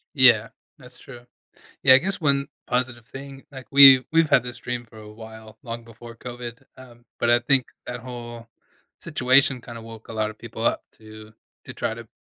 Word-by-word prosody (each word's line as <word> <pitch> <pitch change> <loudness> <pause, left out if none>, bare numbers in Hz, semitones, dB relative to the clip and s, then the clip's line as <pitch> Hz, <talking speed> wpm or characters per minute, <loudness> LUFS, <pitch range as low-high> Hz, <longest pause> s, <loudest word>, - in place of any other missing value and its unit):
Yeah, 120 -5 +5 0.3
that's 125 -3 -14
true. 120 -2 -13 0.6
Yeah, 130 -1 +7
I - - +8
guess 190 +7 -3
one 140 -3 +1 0.2
positive 125 -2 -2
thing, 135 0 -11
like, 130 -3 -11
we've 135 -2 +9
we've 165 -1 +3
had - - +5
this 125 0 -7
dream 125 -1 -5
for 110 - -16
a 105 0 -12
while, 110 0 -13
long 115 -1 -7
before 115 0 -13
COVID, 120 -1 -9
um, 120 -2 -16
but 120 - 0
I 120 - +5
think 130 +1 +1 0.2
that 125 0 -5
whole 120 -1 -9 0.5
situation 130 +1 +2
kinda 115 -1 -10
woke 115 -1 -12
a - - -8
lot 110 -1 -2
of 110 - -15
people 115 -1 -8
up - - 0
to 110 0 -14 0.3
to - - -9
try - - -3
to - - -11
120 Hz, 190 wpm, -23 LUFS, 115-130 Hz, 0.6 s, we've